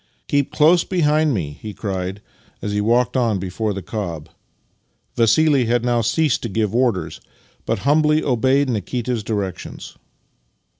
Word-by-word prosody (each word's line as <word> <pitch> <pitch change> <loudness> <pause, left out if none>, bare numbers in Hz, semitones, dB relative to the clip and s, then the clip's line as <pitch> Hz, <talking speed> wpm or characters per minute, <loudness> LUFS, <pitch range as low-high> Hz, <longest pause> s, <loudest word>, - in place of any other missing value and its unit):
" - - -43
Keep 140 -1 +1
close 165 +3 +4
behind 155 -4 +2
me," 75 - -3
he 105 -2 -7
cried 95 -1 -4 0.4
as 105 - -4
he 105 0 0
walked 120 +4 +2
on 115 -5 +1
before 95 +4 -3
the 100 -2 -5
cob. 85 -7 -5 0.9
Vassili 135 +4 +3
had 120 +1 +1
now 120 -1 +2
ceased 125 +6 +1
to 115 - -4
give 105 0 -1
orders, 120 -6 0 0.5
but 115 - +1
humbly 150 +1 +3
obeyed 135 +2 +2
Nikita's 120 0 -2
directions. 100 -4 -5
115 Hz, 145 wpm, -20 LUFS, 105-140 Hz, 0.9 s, close